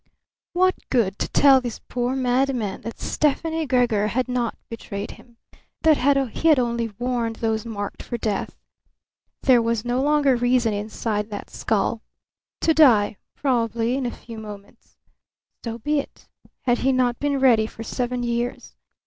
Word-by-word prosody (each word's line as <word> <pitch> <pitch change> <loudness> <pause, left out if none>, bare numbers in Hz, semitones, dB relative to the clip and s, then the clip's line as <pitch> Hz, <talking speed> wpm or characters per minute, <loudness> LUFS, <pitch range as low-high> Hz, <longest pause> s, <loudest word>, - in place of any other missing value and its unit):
What 370 +1 +3 0.2
good 210 -7 +1
to - - -1
tell 270 -2 +5
this 240 -3 -5
poor 245 +1 -3
madman 250 -4 0
that 230 - -7
Stefani 320 +2 0
Gregor 240 -5 +2
had 250 +4 -1
not 245 -2 -1
betrayed 205 -3 -6
him, 240 -2 -17 0.5
that 315 -2 +5 0.4
he 330 - 0
had 310 -3 +6
only 235 -2 0
warned 240 -2 -1
those 220 0 -2
marked 205 -3 -5
for 240 - -4
death? 215 -3 -2 0.9
There 250 -3 +5
was 230 -1 -1
no 245 +2 0
longer 290 -2 +3
reason 245 -2 +2
inside 210 +1 -3
that 205 -1 -7
skull. 220 +1 -1 0.6
To 320 - +3
die, 230 -10 +5 0.2
probably 235 -3 0
in 265 -2 -1
a - - -3
few 230 -2 -10
moments. 205 -2 -12 0.7
So 230 -1 -4
be 295 +6 0
it. 280 - -9 0.4
Had 245 -2 +2
he 270 - +2
not 250 -2 +1
been 285 -1 0
ready 235 -5 +4
for 225 - -9
seven 245 +1 -2
years? 240 0 -3
240 Hz, 155 wpm, -23 LUFS, 225-260 Hz, 0.9 s, had